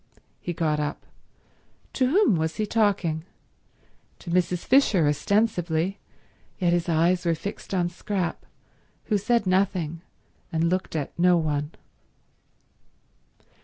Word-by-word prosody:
He 175 - -4
got 155 -3 0
up. 150 0 -4 0.9
To 255 - +2
whom 350 - +4
was 160 0 -1
he 215 - -1
talking? 200 -8 +1 0.9
To 170 - -8
Mrs. 180 0 0
Fisher, 220 - +4
ostensibly, 175 +2 0 0.6
yet 175 -2 +2
his 175 0 0
eyes 170 +2 +2
were 170 -2 +1
fixed 200 +6 -7
on 180 -3 +1
Scrap, 180 0 -3 0.6
who 210 -3 0
said 230 +2 +1
nothing 185 -4 0 0.5
and 165 +1 +1
looked 185 -2 -2
at 145 -3 -3
no 180 0 +5
one. 150 -1 -1
175 Hz, 120 wpm, -25 LUFS, 160-200 Hz, 0.9 s, no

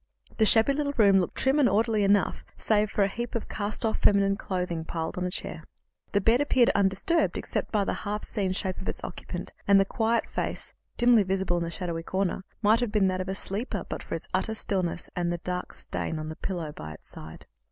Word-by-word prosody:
The 220 - +4
shabby 225 +6 +5
little 285 0 -1
room 200 -4 +6
looked 180 -3 0
trim 270 +3 +2
and 270 - +5
orderly 220 -1 +2
enough, 200 0 +2
save 210 -1 +2
for 205 - +1
a - - +3
heap 235 +4 -5
of 230 - -2
cast 210 +2 -2
off 220 - 0
feminine 200 -1 +4
clothing 180 -5 -3
piled 160 0 -3
upon 180 0 -1
a - - -2
chair. - - -5 0.5
The 200 - +3
bed 225 +6 +3
appeared 260 -4 +4
undisturbed 200 - +2
except - - -3
by 210 -2 +2
the - - -1
half 210 +1 -3
seen 195 -3 -1
shape 185 -1 -3
of - - -4
its - - -5
occupant, 175 0 -6
and 200 -1 +7
the 195 - +4
quiet 225 +3 0
face, - - -4 0.2
dimly 240 -2 +6
visible 190 -2 0
in 170 - -2
its 170 - -5
shadowy 170 -3 -3
corner, 190 +2 -1 0.2
might 215 +2 +5
have 240 -3 -1
been 205 -3 +3
that 185 0 -1
of 185 - -5
a 190 - -2
sleeper 205 +5 -3
but - - -5
for - - -5
its - - -6
utter 220 - 0
stillness 185 -5 -2
and 175 -1 0
for 175 - 0
a - - -4
dark 180 +1 -4
stain 160 - -4
on 155 0 -5
the 160 - -6
pillow 170 -5 -4
by 80 - -8
its 75 - -15
side. 80 +1 -10
195 Hz, 230 wpm, -27 LUFS, 180-220 Hz, 0.5 s, and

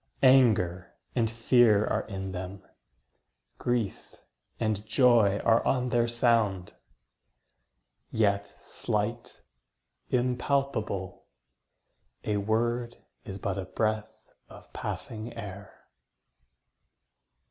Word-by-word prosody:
Anger 110 -10 +4 0.2
and 115 -3 +1
fear 115 -2 +4
are - - -1
in 95 -2 -5
them; 95 +1 -7 1.0
grief 120 -5 -2 0.4
and 110 -2 -1
joy 110 -3 +4
Are 115 0 +4
on 125 -1 +1
their 120 -1 +2
sound; 115 -6 +1 1.4
yet 100 -2 +1
slight, - - -3 0.7
impalpable: 125 -6 -1 1.0
A 105 -1 0
word 120 +3 -1 0.3
is 95 -4 -6
but 100 0 -3
a 95 - -4
breath 110 +2 -1 0.4
of - - -15
passing 110 +2 -5
air. 100 -2 -9
110 Hz, 85 wpm, -28 LUFS, 100-120 Hz, 1.4 s, Anger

